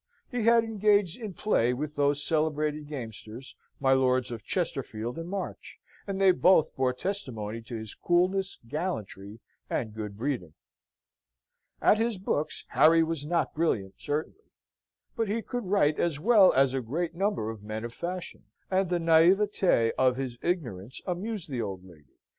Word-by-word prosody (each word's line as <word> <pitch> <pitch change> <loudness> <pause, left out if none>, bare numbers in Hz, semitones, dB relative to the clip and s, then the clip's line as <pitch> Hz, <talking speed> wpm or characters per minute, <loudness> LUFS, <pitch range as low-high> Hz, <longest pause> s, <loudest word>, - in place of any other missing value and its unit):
He 245 -3 -1
had 230 0 +6
engaged 210 -3 +2
in 210 -5 -6
play 125 - +1
with 150 +3 -4
those 145 0 +1
celebrated 150 -1 0
gamesters, 120 -2 -8 0.2
my 135 -1 +4
Lords 130 -1 +2
of 115 -2 -6
Chesterfield 125 - -3
and 165 +1 -6
March; 195 0 -6 0.3
and 195 -1 -3
they 195 -1 +6
both 180 -2 +4
bore 130 -2 +2
testimony 125 - -4
to 115 +1 -8
his 110 -1 -6
coolness, 185 +2 +1
gallantry, 115 - -5 0.3
and 110 -3 -2
good 105 -2 -6
breeding. 115 - -3 1.3
At 215 - +5
his 225 -2 0
books 155 -5 -2
Harry 165 +1 +5
was 160 -3 -3
not 170 +1 0
brilliant 115 - 0
certainly; 155 - -4 0.7
but 225 - 0
he 220 +2 -1
could 245 -3 -4
write 170 -6 +2
as 160 -4 0
well 205 +1 +6
as 135 -1 +3
a 135 - 0
great 160 +9 -3
number 195 - -1
of 110 -2 -10
men 110 +2 -5
of 120 - -7
fashion; 175 +6 -6 0.3
and 190 -1 +2
the 175 - +1
naivete 170 - +4
of 130 -1 +4
his 125 -3 -4
ignorance 130 - -3
amused 195 +2 -3
the 130 -5 -3
old 95 -4 -5
lady. 75 -7 -18
150 Hz, 160 wpm, -28 LUFS, 120-185 Hz, 1.3 s, had